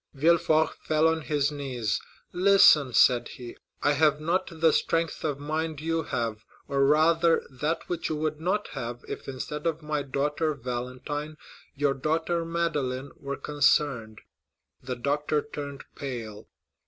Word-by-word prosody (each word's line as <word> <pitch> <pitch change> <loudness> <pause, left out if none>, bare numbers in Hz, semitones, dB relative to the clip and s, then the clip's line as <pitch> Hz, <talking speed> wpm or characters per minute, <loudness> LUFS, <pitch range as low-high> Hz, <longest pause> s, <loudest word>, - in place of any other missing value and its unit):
Villefort 160 +1 +3
fell 155 +1 +2
on 160 0 +1
his 145 -1 0
knees. 125 -7 -2 0.3
"Listen," 180 -7 +6
said 120 0 +4
he; 120 -2 -9 0.3
"I 145 - +4
have 150 0 +3
not 170 +5 0
the 160 -1 +3
strength 165 0 0
of 150 -3 -1
mind 155 +1 -3
you 165 +1 -1
have, 115 -7 -3 0.2
or 140 -1 +1
rather 165 +3 +4
that 150 +6 -2
which 175 -2 -2
you 155 - -1
would 155 0 -2
not 195 +5 -1
have, 120 0 -6
if - - -7
instead 150 +4 -4
of 160 -1 -2
my 150 -1 -1
daughter 145 +3 -1
Valentine 130 +5 -5 0.4
your 145 -1 +1
daughter 160 +4 -1
Madeleine 145 -6 -2
were 140 0 -5
concerned." 140 -7 +1 0.6
The 125 0 -4
doctor 145 +4 0
turned 145 -1 -7
pale. 115 -6 -6
150 Hz, 140 wpm, -27 LUFS, 135-160 Hz, 0.6 s, Listen